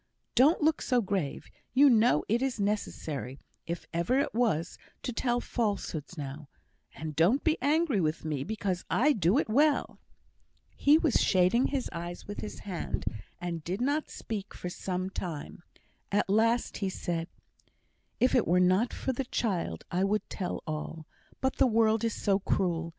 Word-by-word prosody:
Don't 290 +6 +4
look 315 0 +3
so 250 -2 +2
grave. 185 -9 -2 0.3
You 285 +2 +7
know 230 - +4
it 230 +3 +1
is 265 -4 -1
necessary, 155 -10 -2 0.3
if 170 0 -4
ever 170 +10 +1
it 280 - 0
was, 215 -9 0 0.2
to 250 - -3
tell 240 +1 0
falsehoods 200 - -3
now; 140 0 -6 0.5
and 155 -2 -6
don't 180 - +3
be 320 -1 +3
angry 290 - +2
with 155 0 -1
me 150 -4 -2
because 195 -1 -2
I 295 +6 +4
do 195 - +2
it - - +1
well." 285 +6 +2 0.8
He 290 +2 +5
was 320 -6 +2
shading 185 +7 +3
his 275 -3 -2
eyes 175 +1 -6
with 205 - -6
his 215 - -7
hand, 185 -4 -4 0.3
and 170 -2 -4
did 180 +6 -3
not 285 +5 0
speak 205 -3 -6
for 180 - -5
some 185 +1 -3
time. 170 -4 -6 0.5
At 205 +1 +2
last 230 +3 +2
he 195 - -1
said: 170 -3 -3 0.9
"If 250 - +3
it 245 - +3
were 180 +2 +4
not 185 +6 +3
for 265 - -2
the 265 +2 -3
child, 180 - -2
I 180 +2 +1
would 210 +2 0
tell 185 -3 -3
all; 155 0 -5 0.4
but 265 0 0
the - - +5
world 225 -1 +3
is 230 -2 0
so 195 -1 +1
cruel. 170 -4 0
200 Hz, 165 wpm, -29 LUFS, 170-245 Hz, 0.9 s, You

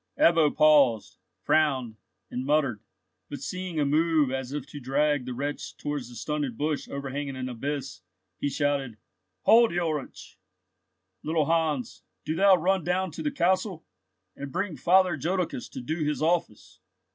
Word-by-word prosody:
Ebbo 165 -3 +5
paused, 140 -8 +4 0.3
frowned, 135 -7 +1 0.4
and 125 - -3
muttered, 140 -6 +1 0.5
but 145 - -6
seeing 180 +3 -4
a 145 - +2
move 155 -1 +2
as 130 -1 -4
if 145 -2 -4
to 145 +1 -9
drag 145 +1 +1
the 125 - -4
wretch 145 +3 -4
towards 145 -5 -4
the 120 - -12
stunted 135 0 -3
bush 150 0 -2
overhanging 140 0 -4
an 130 0 -4
abyss, 135 -3 -4 0.4
he 145 - 0
shouted, 140 -5 -1 0.5
"Hold, 225 -6 +5
Ulrich! 155 -5 -4 0.8
Little 155 -1 0
Hans, 160 -5 -1 0.2
do 155 - -1
thou 195 +2 +6
run 185 +1 +1
down 180 +2 0
to 155 - -7
the 300 - 0
castle, 185 - 0 0.5
and 140 -1 -7
bring 185 0 -2
Father 180 +6 +3
Jodocus 180 -7 -2
to - - -7
do 155 +7 -3
his 150 0 -1
office!" 160 -8 -1
150 Hz, 150 wpm, -27 LUFS, 135-165 Hz, 0.8 s, thou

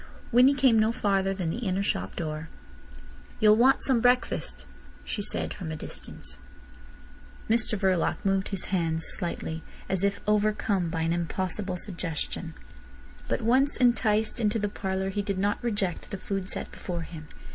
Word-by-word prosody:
Winnie 255 +4 +6
came 255 -5 +5
no 215 +1 +3
farther 195 -4 +1
than 185 -4 -2
the 230 - -3
inner 195 -4 0
shop 95 - -2
door. 155 -1 -4 0.9
"You'll 215 0 +7
want 255 +4 +4
some 255 -4 +3
breakfast," 245 0 +1 0.4
she 210 - -3
said - - -1
from 175 -5 -6
a - - -3
distance. - - -7 1.1
Mr 225 -1 +2
Verloc 190 -3 +2
moved 195 0 +2
his 195 -3 -1
hands 165 -3 +1
slightly, 165 -2 -1 0.3
as 190 0 +1
if 200 0 +1
overcome 210 -3 +1
by 165 0 -2
an 165 +1 +1
impossible 185 +2 -2
suggestion. 170 -2 -3 0.7
But - - -1
once 260 +5 +3
enticed 225 -3 +2
into 215 -1 +1
the 205 -1 -1
parlour 190 -1 -2
he 205 - -1
did 200 -1 -2
not 205 +4 0
reject 205 -6 -2
the 200 - -4
food 195 0 -3
set - - -3
before 175 -2 -5
him. 155 -2 -9
195 Hz, 155 wpm, -27 LUFS, 175-220 Hz, 1.1 s, You'll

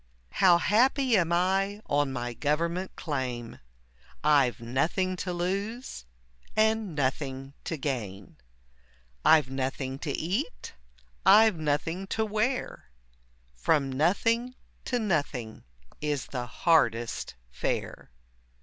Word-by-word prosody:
How 180 -3 +5
happy 250 +7 +3
am 170 -4 +2
I 195 +3 +1
on 145 -1 +1
my 120 -2 -4
government 170 +8 -1
claim, 125 -6 -4 0.6
I've 140 -5 +3
nothing 160 +10 0
to 180 - -3
lose, 195 - -3 0.5
and 220 -4 +1
nothing 135 -1 -2
to 165 - -3
gain; 105 -9 -5 0.9
I've 150 -5 +5
nothing 135 0 -3
to 155 - -4
eat, 195 - -3 0.5
I've 215 -1 +6
nothing 160 +5 -1
to 220 - +2
wear, 215 - -2 0.6
From 135 - +1
nothing 230 - +1 0.3
to 250 - 0
nothing 145 - -2 0.4
is 145 -4 -1
the 125 -2 -5
hardest 120 - +1 0.2
fare. - - -3
160 Hz, 105 wpm, -28 LUFS, 130-195 Hz, 0.9 s, I've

